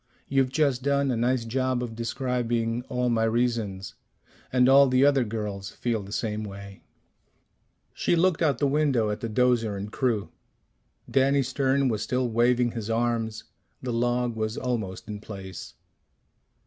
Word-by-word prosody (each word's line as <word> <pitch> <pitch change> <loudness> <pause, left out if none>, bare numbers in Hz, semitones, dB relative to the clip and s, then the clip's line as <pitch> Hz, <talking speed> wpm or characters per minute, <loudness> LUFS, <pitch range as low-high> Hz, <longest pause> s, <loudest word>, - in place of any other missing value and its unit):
You've 135 -1 +2
just 135 -2 +1
done 140 0 +1
a - - 0
nice 120 +1 +1
job 130 +1 0
of 115 -2 -6
describing 120 -1 -1
all 125 0 0
my 115 -1 +1
reasons. 115 -4 -1 0.6
And 125 -1 +4
all 140 +1 +7
the 130 +1 +4
other 140 -2 +4
girls 105 -3 -4
feel 115 -3 -2
the 100 0 -10
same 110 -1 -2
way." 100 -1 -9 1.1
She - - +1
looked 175 0 +2
out 145 -6 +2
the 145 - +1
window 135 -6 +2
at 105 - -4
the 115 - -4
'dozer 115 -2 +2
and 100 +2 -6
crew. 115 -6 -1 0.8
Danny 135 +1 +3
Stern 135 +1 +1
was 110 -4 -1
still 125 +2 0
waving 120 +1 +2
his 115 -2 -5
arms; 115 -1 -1 0.4
the 125 -2 -2
log 120 0 0
was 110 0 -2
almost 115 -4 -3
in 105 -1 -6
place. 95 -3 -9
120 Hz, 155 wpm, -26 LUFS, 110-130 Hz, 1.1 s, all